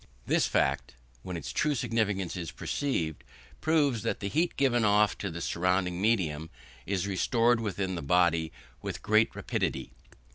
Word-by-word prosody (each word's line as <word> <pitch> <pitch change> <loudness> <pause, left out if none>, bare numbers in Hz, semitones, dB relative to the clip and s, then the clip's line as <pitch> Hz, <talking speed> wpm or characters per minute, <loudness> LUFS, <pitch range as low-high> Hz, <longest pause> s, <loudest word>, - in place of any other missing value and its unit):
This - - +2
fact, - - 0 0.3
when 90 +3 -5
its - - -6
true 150 -1 +1
significance 105 -7 -1
is 85 -3 -4
perceived, 85 - -2 0.4
proves 145 -7 +2
that - - -2
the 100 - -3
heat 165 - 0
given 125 -4 +3
off 105 0 +4
to 100 - -3
the 85 0 -6
surrounding 90 +1 0
medium 80 -8 +1 0.4
is 95 -2 0
restored 115 +4 +2
within 100 -3 -2
the 85 - -3
body 85 +1 +2 0.3
with - - -5
great 110 +2 +3
rapidity. - - -2
100 Hz, 150 wpm, -29 LUFS, 90-115 Hz, 0.4 s, off